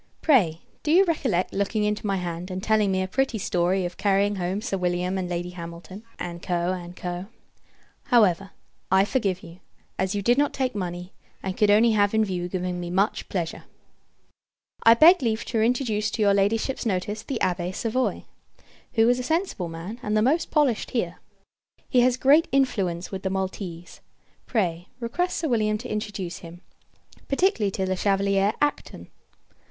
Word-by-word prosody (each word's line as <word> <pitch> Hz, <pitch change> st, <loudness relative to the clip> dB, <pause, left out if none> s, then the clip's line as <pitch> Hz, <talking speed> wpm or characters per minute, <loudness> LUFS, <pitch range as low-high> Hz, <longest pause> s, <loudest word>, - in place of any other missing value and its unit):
Pray, 185 Hz, -, +3 dB, 0.2 s
do -, -, -4 dB
you 375 Hz, +4 st, +6 dB
recollect 260 Hz, -, 0 dB
looking 200 Hz, +2 st, 0 dB
into 210 Hz, 0 st, -1 dB
my 195 Hz, -, +1 dB
hand, 175 Hz, 0 st, -4 dB
and 185 Hz, 0 st, -5 dB
telling 215 Hz, -2 st, +2 dB
me 190 Hz, 0 st, +1 dB
a -, -, -3 dB
pretty 265 Hz, +3 st, 0 dB
story 180 Hz, -1 st, 0 dB
of 175 Hz, 0 st, -6 dB
carrying 200 Hz, 0 st, +2 dB
home 185 Hz, +2 st, -2 dB
Sir 215 Hz, -2 st, -3 dB
William 180 Hz, 0 st, -1 dB
and 185 Hz, -2 st, -2 dB
Lady 175 Hz, 0 st, -3 dB
Hamilton, 170 Hz, +3 st, -9 dB, 0.2 s
&c. 170 Hz, -1 st, -5 dB
&c. 175 Hz, 0 st, -3 dB, 0.8 s
However, 195 Hz, -7 st, +3 dB, 0.4 s
I 190 Hz, +1 st, +4 dB
forgive 200 Hz, -6 st, -1 dB
you; 170 Hz, +2 st, -12 dB, 0.4 s
as 190 Hz, +2 st, 0 dB
you 200 Hz, -, -2 dB
did 240 Hz, +6 st, +3 dB
not 290 Hz, -, +2 dB
take 260 Hz, -2 st, -1 dB
money, 180 Hz, -2 st, -5 dB, 0.3 s
and 190 Hz, -1 st, -3 dB
could 210 Hz, 0 st, +3 dB
only 220 Hz, +3 st, +5 dB
have 205 Hz, 0 st, +2 dB
in 220 Hz, 0 st, +3 dB
view 180 Hz, -3 st, -3 dB
giving 180 Hz, -1 st, -3 dB
me 175 Hz, -1 st, -5 dB
much 195 Hz, +4 st, 0 dB
pleasure. 170 Hz, -4 st, -3 dB, 1.2 s
I 230 Hz, 0 st, +7 dB
beg 335 Hz, +7 st, +7 dB
leave 225 Hz, -3 st, -1 dB
to 225 Hz, -3 st, -1 dB
introduce 225 Hz, -3 st, +1 dB
to 220 Hz, -, -1 dB
your 200 Hz, -1 st, +4 dB
Ladyship's 215 Hz, +6 st, +1 dB
notice 205 Hz, 0 st, -2 dB
the 270 Hz, -, -4 dB
Abbé 180 Hz, -1 st, -1 dB
Savoye; 230 Hz, +6 st, -1 dB, 0.7 s
who 225 Hz, -2 st, +4 dB
is 245 Hz, +1 st, +3 dB
a -, -, -3 dB
sensible 320 Hz, -, -1 dB
man, 170 Hz, +8 st, -7 dB
and 210 Hz, -1 st, 0 dB
the 215 Hz, -, +3 dB
most 310 Hz, +8 st, +1 dB
polished 285 Hz, -8 st, +1 dB
here. 180 Hz, -8 st, -2 dB, 0.7 s
He 255 Hz, -, +3 dB
has 250 Hz, 0 st, +3 dB
great 285 Hz, +5 st, +5 dB
influence 195 Hz, -11 st, 0 dB
with 190 Hz, -1 st, -5 dB
the 190 Hz, -, -2 dB
Maltese. 185 Hz, -2 st, -5 dB, 0.5 s
Pray, 175 Hz, -7 st, -1 dB
request 345 Hz, +10 st, -1 dB
Sir 325 Hz, -, -1 dB
William 215 Hz, -4 st, +1 dB
to 245 Hz, +3 st, -8 dB
introduce 200 Hz, -5 st, -4 dB
him 170 Hz, +1 st, -11 dB, 0.7 s
particularly 275 Hz, -, +2 dB
to 190 Hz, 0 st, -2 dB
Le 185 Hz, 0 st, -1 dB
Chevalier 195 Hz, +1 st, +2 dB
Acton. 295 Hz, 0 st, -2 dB
200 Hz, 170 wpm, -25 LUFS, 180-230 Hz, 1.2 s, I